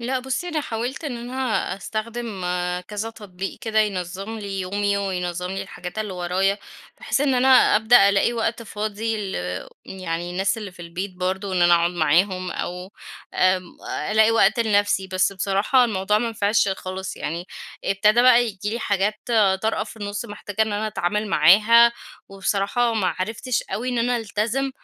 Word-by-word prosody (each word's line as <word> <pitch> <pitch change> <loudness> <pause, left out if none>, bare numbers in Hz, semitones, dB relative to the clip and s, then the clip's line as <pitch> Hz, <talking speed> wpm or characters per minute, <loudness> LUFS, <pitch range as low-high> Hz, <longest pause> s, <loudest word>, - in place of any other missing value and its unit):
لأ، 255 +2 -1
بُصّي، 265 +7 -3
أنا 320 -3 -1
حاولت 245 +3 -4
إن 270 -5 -3
أنا 240 +2 -7 0.4
أستخدم 220 +1 -5 0.5
كذا 210 +2 -4
تطبيق 195 -4 -7
كده 220 -4 -1
ينظم 195 +2 -3
لي 200 -2 -4
يومي، 200 +2 0
وينظم 180 -2 -3
لي 195 - -3
الحاجات 180 +3 -8
اللي 215 -3 -3
ورايا، 185 +3 0 0.4
بحيث - - -1
إن 280 -2 +2
أنا 255 +1 +3 0.3
أبدأ 220 -2 +6
ألاقي 200 +4 +2
وقت 230 0 -2
فاضي 215 +1 -3 0.2
ل - - -5 0.5
يعني 175 -2 -4
الناس 195 +5 0
اللي 205 -4 -7
في 180 - -11
البيت 180 +3 -6
برضو، 190 +2 -2
إن 180 -1 +2
أنا 175 0 +6
أقعد 170 0 +2
معاهم 180 +3 +1
أو 180 +2 -5 0.4
آمم، 185 0 +2 0.4
ألاقي 220 +1 +5
وقت 225 +1 +3
لنفسي، 205 -3 +2
بس 185 +1 +1
بصراحة 200 +6 +2
الموضوع 210 -2 +1
ما 235 - -1
نفعش 205 -1 +2
خلاص. 190 0 -5
يعني 170 +3 -4 0.4
ابتدا 210 +4 +3
بقى 245 -1 +6
ييجي 205 -2 -4
لي 230 - -2
حاجات 210 -1 0 0.4
طارئة 220 -1 0
في 225 - -12
النُص 205 +1 -4
محتاجة 205 -1 -3
إن 220 - -1
أنا 210 +1 -1
أتعامل 210 +1 -1
معاها، 215 +9 +6 0.4
وبصراحة 200 +4 0
ما 205 -4 +1
عرفتش 220 +5 -2
أوي 245 +4 -4
إن 245 -1 -1
أنا 245 +1 +1
ألتزم 225 +5 -1
205 Hz, 165 wpm, -23 LUFS, 190-225 Hz, 0.5 s, أبدأ